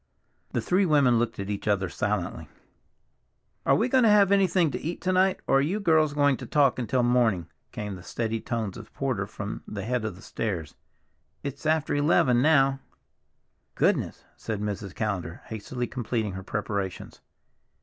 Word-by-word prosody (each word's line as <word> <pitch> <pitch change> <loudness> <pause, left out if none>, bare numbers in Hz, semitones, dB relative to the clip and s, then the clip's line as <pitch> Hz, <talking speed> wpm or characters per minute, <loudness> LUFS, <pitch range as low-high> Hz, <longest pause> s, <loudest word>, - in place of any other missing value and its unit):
The - - 0
three 185 +3 +2
women 135 -7 +4
looked 115 -1 -1
at 100 +1 -4
each 100 +1 -5
other 100 -2 +2
silently. 105 0 -3 1.2
"Are - - +6
we 230 - +2
to 260 0 +4
have 205 -2 +5
anything 185 -5 +3
to - - -4
eat 170 +3 -4
to 185 - 0
night, 185 +1 +2
or 135 - +4
are - - +3
you 175 +9 0
girls 160 -6 +3
going 145 -2 +3
to - - -8
talk 140 -4 +3
until 125 +1 0
morning?" 120 -8 +2 0.3
came 105 -1 -5
the 90 - -9
steady 115 +4 -3
tones 115 -6 -3
of - - -11
Porter - - -1
from - - -6
the - - -5
head 125 0 -1
of 110 -4 -3
the 95 - -14
stairs. 90 -9 -4 0.7
"It's 140 +2 -5
after 155 -1 +1
eleven 145 -4 +3
now." 135 -2 +4 1.0
"Goodness!" - - +1
said 110 -2 -4
Mrs. 100 -2 -4
Callender, 95 -6 -3
hastily 120 +3 -4
completing 115 -4 -2
her 95 0 -6
preparations. 100 -1 -4
120 Hz, 170 wpm, -27 LUFS, 105-150 Hz, 1.2 s, Are